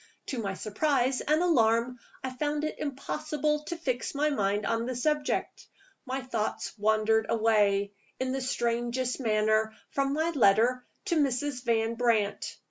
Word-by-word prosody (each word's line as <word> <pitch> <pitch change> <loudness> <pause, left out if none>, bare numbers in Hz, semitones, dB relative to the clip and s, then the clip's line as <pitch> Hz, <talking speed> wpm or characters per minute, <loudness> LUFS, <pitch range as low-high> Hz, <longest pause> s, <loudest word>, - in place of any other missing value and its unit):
To 260 - -2
my 195 -3 -3
surprise 255 +5 0
and 310 +3 +2
alarm, 235 -6 +2 0.2
I 260 - -3
found 295 +3 -2
it 310 - -3
impossible 300 +1 -2
to 340 - -4
fix 255 -5 -2
my 300 +2 +2
mind 205 -4 0
on 230 +1 0
the 255 - -3
subject. 295 +3 -1 0.4
My 260 +1 -2
thoughts 230 -4 -3
wandered 220 +1 +2
away, 205 -3 +2 0.3
in 260 0 -1
the 270 0 -2
strangest 240 +1 -1
manner, 220 -2 +1 0.2
from 275 0 0
my 320 +3 0
letter 245 -1 +3 0.2
to 345 -5 +1
Mrs. 275 -2 0
Van 225 -1 +1
Brandt. 230 -4 0
250 Hz, 145 wpm, -29 LUFS, 220-285 Hz, 0.4 s, letter